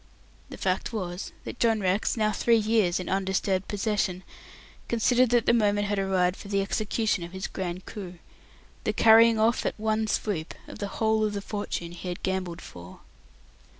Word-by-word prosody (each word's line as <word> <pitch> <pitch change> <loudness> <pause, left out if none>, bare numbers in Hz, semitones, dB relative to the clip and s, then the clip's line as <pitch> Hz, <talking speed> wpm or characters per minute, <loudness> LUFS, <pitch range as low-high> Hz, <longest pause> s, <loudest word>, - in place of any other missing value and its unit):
The - - -9
fact 185 0 -1
was 185 -4 -4
that - - -8
John 225 -2 +3
Rex, 195 +4 0
now 215 -1 +2
three 230 +3 +3
years 215 -5 +2
in 185 - -5
undisturbed 190 0 0
possession, 200 -3 -1 0.6
considered 240 +2 +3
that 240 -1 +3
the - - +4
moment 205 -2 +2
had 205 -1 0
arrived 185 -1 +1
for - - -10
the 200 -1 +1
execution 210 -1 -1
of 170 +2 -9
his 190 0 -4
grand 180 0 -5
coup 185 -4 -8 0.7
the - - 0
carrying 225 0 +6
off 225 +2 +2
at - - -3
one 220 0 0
swoop 190 -7 -2
of - - -10
the 200 - -2
whole 220 -1 +2
of 210 -1 0
the 200 - -2
fortune 195 -5 -4
he 175 +1 -8
had 175 -1 -5
gambled 185 -3 -2
for. 90 +1 -12
205 Hz, 180 wpm, -27 LUFS, 185-220 Hz, 0.7 s, carrying